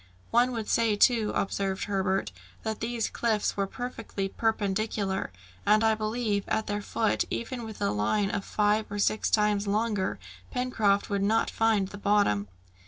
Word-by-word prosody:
"One 245 Hz, +2 st, +4 dB
would 225 Hz, -2 st, -3 dB
say 230 Hz, -2 st, +2 dB
too," 220 Hz, 0 st, +4 dB
observed 195 Hz, -1 st, -1 dB
Herbert, 195 Hz, -, 0 dB, 0.3 s
"that 220 Hz, -1 st, -3 dB
these 230 Hz, -1 st, -1 dB
cliffs 220 Hz, -3 st, 0 dB
were 195 Hz, -1 st, 0 dB
perfectly 225 Hz, -4 st, -4 dB
perpendicular; 205 Hz, -, -1 dB, 0.3 s
and 215 Hz, +1 st, +4 dB
I 220 Hz, 0 st, +4 dB
believe 215 Hz, -1 st, -1 dB
that -, -, +1 dB
at 220 Hz, -, -1 dB
their 205 Hz, 0 st, -2 dB
foot, 220 Hz, +1 st, 0 dB
even 240 Hz, +1 st, -4 dB
with 220 Hz, -2 st, -8 dB
a -, -, +2 dB
line 150 Hz, -, +1 dB
five 210 Hz, +2 st, +1 dB
or 205 Hz, -, -3 dB
six 215 Hz, +1 st, +1 dB
times 210 Hz, -1 st, +2 dB
longer, 210 Hz, -1 st, 0 dB, 0.3 s
Pencroft 220 Hz, -6 st, +1 dB
would 200 Hz, -1 st, +1 dB
not 220 Hz, +3 st, +2 dB
find 220 Hz, -4 st, +2 dB
the 205 Hz, -, -9 dB
bottom." 200 Hz, -, +2 dB
210 Hz, 160 wpm, -28 LUFS, 200-225 Hz, 0.3 s, One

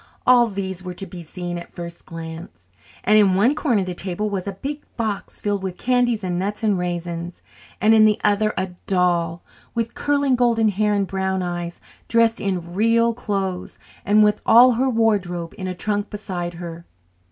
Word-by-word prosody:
All 245 Hz, -1 st, +6 dB
these 190 Hz, -3 st, -4 dB
were 180 Hz, -1 st, -6 dB
to 195 Hz, -, -5 dB
be 180 Hz, -1 st, -9 dB
seen 175 Hz, +1 st, -5 dB
at 170 Hz, -, -10 dB
the -, -, -33 dB
first 170 Hz, 0 st, -8 dB
glance; 160 Hz, -, -9 dB, 0.3 s
and 215 Hz, +2 st, +5 dB
in 195 Hz, -3 st, +4 dB
one 220 Hz, +8 st, +4 dB
corner 245 Hz, -9 st, +1 dB
of -, -, -2 dB
the 180 Hz, -, -4 dB
table 190 Hz, +3 st, -2 dB
was 195 Hz, -1 st, -3 dB
a 200 Hz, -, -2 dB
big 285 Hz, +9 st, -5 dB, 0.2 s
box 220 Hz, -4 st, -3 dB
filled 205 Hz, -1 st, -1 dB
with 190 Hz, -1 st, -4 dB
candies 245 Hz, -3 st, +1 dB
and 180 Hz, -1 st, -1 dB
nuts 205 Hz, +4 st, -3 dB
and 210 Hz, -2 st, +3 dB
raisins, 175 Hz, -1 st, -4 dB, 0.4 s
and 220 Hz, +1 st, +5 dB
in 220 Hz, -1 st, +7 dB
the 210 Hz, -1 st, +3 dB
other 210 Hz, +1 st, +2 dB
a 185 Hz, 0 st, -2 dB, 0.2 s
doll 175 Hz, -3 st, +1 dB, 0.3 s
with 230 Hz, 0 st, -1 dB
curling 285 Hz, -2 st, +1 dB
golden 235 Hz, -3 st, +3 dB
hair 210 Hz, +1 st, +1 dB
and 200 Hz, -1 st, +1 dB
brown 190 Hz, 0 st, -1 dB
eyes, 175 Hz, -1 st, -4 dB, 0.3 s
dressed 230 Hz, 0 st, +3 dB
in 180 Hz, -3 st, -3 dB
"real" 230 Hz, +3 st, +3 dB
clothes 195 Hz, -5 st, -3 dB, 0.3 s
and 210 Hz, +1 st, +5 dB
with 210 Hz, 0 st, +2 dB
all 240 Hz, +3 st, +7 dB
her 255 Hz, +3 st, +1 dB
wardrobe 195 Hz, -8 st, 0 dB
in 190 Hz, -3 st, -5 dB
a 185 Hz, -, -4 dB
trunk 205 Hz, +2 st, -1 dB
beside 180 Hz, -4 st, -5 dB
her. 170 Hz, -1 st, -7 dB
195 Hz, 190 wpm, -22 LUFS, 175-220 Hz, 0.4 s, in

